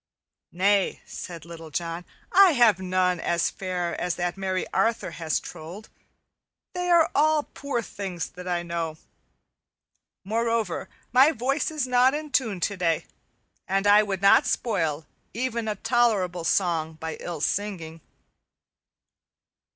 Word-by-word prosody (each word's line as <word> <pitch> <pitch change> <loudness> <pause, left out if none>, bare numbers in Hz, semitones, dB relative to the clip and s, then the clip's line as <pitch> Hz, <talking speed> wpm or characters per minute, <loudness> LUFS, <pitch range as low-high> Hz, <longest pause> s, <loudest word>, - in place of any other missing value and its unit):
"Nay," 195 +2 +2
said 170 -3 -8
Little 165 -1 -10
John, 170 +3 -4 0.3
"I 380 -2 +7
have 235 -7 +5
none 185 -1 +1
as 170 0 0
fair 180 -2 -3
as 180 -1 -1
that 175 -1 -2
merry 190 -1 -2
Arthur 230 0 +1
has 160 -2 -1
trolled. 175 +7 -10 0.8
They 360 0 -2
are 340 -2 +5
all 305 +1 +3
poor 275 -4 -3
things 190 -5 -5
that 180 0 -10
I 175 -1 -1
know. 165 -2 -3 1.3
Moreover, 225 -2 -1 0.2
my 265 +5 +7
voice 275 +3 -1
is 305 -4 -2
not 255 +2 +4
in 305 -1 -5
tune 225 -8 0
today, 175 -4 0 0.6
and 195 +1 0
I 205 +1 +7
would 200 -2 -3
not 195 - +6
spoil 160 -9 -1 0.3
even 235 -2 -2
a 210 - -1
tolerable 205 -7 +1
song 165 -4 +1
by 160 0 -6
ill 170 -3 -5
singing." 165 -3 -3
195 Hz, 130 wpm, -25 LUFS, 170-235 Hz, 1.3 s, I